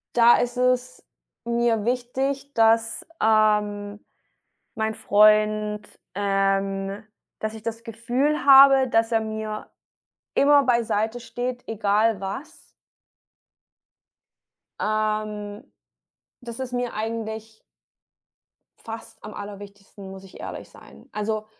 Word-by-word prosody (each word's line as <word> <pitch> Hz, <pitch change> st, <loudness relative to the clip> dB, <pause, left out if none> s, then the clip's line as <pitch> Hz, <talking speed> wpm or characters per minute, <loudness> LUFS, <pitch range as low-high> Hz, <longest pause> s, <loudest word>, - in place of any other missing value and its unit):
da 240 Hz, 0 st, +7 dB
ist 245 Hz, 0 st, -2 dB
es 250 Hz, -, 0 dB, 0.4 s
mir 235 Hz, -2 st, 0 dB
wichtig, 265 Hz, +3 st, -2 dB
dass, 225 Hz, 0 st, +2 dB, 0.2 s
ähm, 210 Hz, -1 st, +1 dB, 0.7 s
mein 220 Hz, 0 st, -1 dB
Freund, 210 Hz, 0 st, +3 dB, 0.3 s
ähm 195 Hz, 0 st, -1 dB, 0.4 s
dass 215 Hz, 0 st, -4 dB
ich 220 Hz, -, -9 dB
das 230 Hz, 0 st, -5 dB
Gefühl 250 Hz, +6 st, -1 dB
habe, 270 Hz, -1 st, +8 dB
dass 225 Hz, -1 st, +1 dB
er 225 Hz, -, +3 dB
mir 220 Hz, -1 st, -5 dB, 0.7 s
immer 285 Hz, 0 st, +5 dB
beiseite 235 Hz, -2 st, 0 dB
steht, 245 Hz, +1 st, -5 dB
egal 215 Hz, -1 st, +1 dB
was 195 Hz, +10 st, -6 dB, 2.2 s
ähm, 215 Hz, -1 st, -2 dB, 0.8 s
dass 235 Hz, -1 st, -8 dB
ist 260 Hz, -1 st, -5 dB
mir 245 Hz, -1 st, -2 dB
eigentlich 220 Hz, 0 st, -5 dB, 1.2 s
fast 225 Hz, 0 st, -9 dB
am 215 Hz, -, -8 dB
aller 205 Hz, -1 st, -8 dB
wichtigsten, 200 Hz, -1 st, -12 dB
muss 190 Hz, 0 st, -11 dB
ich 190 Hz, -, -14 dB
ehrlich -, -, -7 dB
sein. -, -, -17 dB
Also, 215 Hz, 0 st, -3 dB
220 Hz, 105 wpm, -24 LUFS, 210-240 Hz, 2.2 s, habe